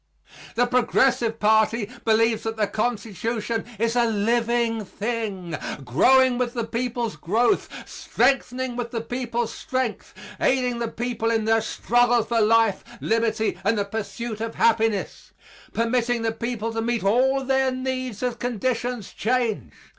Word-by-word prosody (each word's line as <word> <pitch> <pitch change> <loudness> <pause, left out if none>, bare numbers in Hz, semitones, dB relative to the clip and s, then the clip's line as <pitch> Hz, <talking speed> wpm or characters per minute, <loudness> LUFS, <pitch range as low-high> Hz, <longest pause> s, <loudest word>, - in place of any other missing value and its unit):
The 245 - +3
Progressive 245 -2 +2
party 220 0 +3 0.2
believes 225 0 +3
that 225 0 -4
the 215 - +2
Constitution 225 +1 -2
is 230 +3 0
a 240 - +4
living 230 +1 +1
thing, 205 -5 -4 0.3
growing 255 - +4
with 245 0 -1
the 235 - -1
people's 235 -1 -2
growth, 225 - +1 0.2
strengthening 260 -2 0
with 240 -1 -3
the 230 -1 -3
people's 240 -1 -3
strength, 260 -6 -3 0.2
aiding 250 -2 +1
the 235 - -1
people 230 -1 -2
in 225 -1 +1
their 225 0 +3
struggle 240 +2 +2
for 230 0 0
life, 220 -2 +3 0.2
liberty 220 -1 0
and 210 +3 +2
the 200 - 0
pursuit 220 +2 -5
of 225 0 -4
happiness, 225 -3 +1 0.4
permitting 235 0 0
the 225 - +1
people 230 0 -3
to 225 - -1
meet 235 -1 -1
all 260 +6 +3
their 265 0 +2
needs 255 -3 -3
as 250 -1 0
conditions 245 -1 -2
change. 235 -1 -1
230 Hz, 140 wpm, -24 LUFS, 220-245 Hz, 0.4 s, a